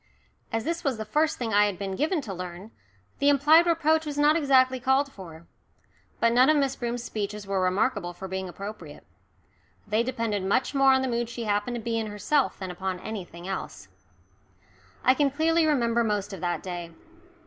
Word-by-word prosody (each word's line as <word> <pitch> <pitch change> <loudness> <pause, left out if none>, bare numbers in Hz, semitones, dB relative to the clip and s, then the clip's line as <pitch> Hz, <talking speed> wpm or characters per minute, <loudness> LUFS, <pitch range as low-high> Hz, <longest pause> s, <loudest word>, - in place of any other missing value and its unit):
As 225 0 -1
this 335 +2 -3
was 275 -6 0
the 220 - -5
first 305 +8 +1
thing 230 -3 -3
I 205 0 +5
had 200 -3 -4
been 195 -1 -4
given 310 - 0
to 210 -7 -6
learn, 180 +3 -8 0.5
the 285 - +4
implied 300 +4 +5
reproach 320 -1 +2
was 295 -2 -5
not 295 +1 +4
exactly 260 -4 +3
called 265 +3 +1
for. 170 -4 -11 0.7
But 230 0 +3
none 255 +4 +5
of 310 - +4
Miss 275 -2 +1
Broom's 240 -1 -4
speeches 210 -2 -4
were 195 -1 -1
remarkable 185 0 0
for 190 +2 -8
being 190 0 -4
appropriate. 200 +4 -9 0.8
They 215 +2 +1
depended 230 -5 -2
much 200 +10 0
more 275 -1 +5
on 265 0 +3
the - - 0
mood 235 -1 -1
she 235 0 -5
happened 210 +3 -1
to - - -3
be 230 0 -1
in 220 - -3
herself 210 +8 0
than 190 -2 -5
upon 185 0 -4
anything 180 -5 -7
else. 100 - -6 1.1
I 255 - +6
can 280 +1 +2
clearly 320 +3 +2
remember 235 -5 +2
most 205 -2 -2
of 190 - -8
that 175 -1 -2
day. 175 -2 -6
230 Hz, 190 wpm, -26 LUFS, 195-275 Hz, 1.1 s, I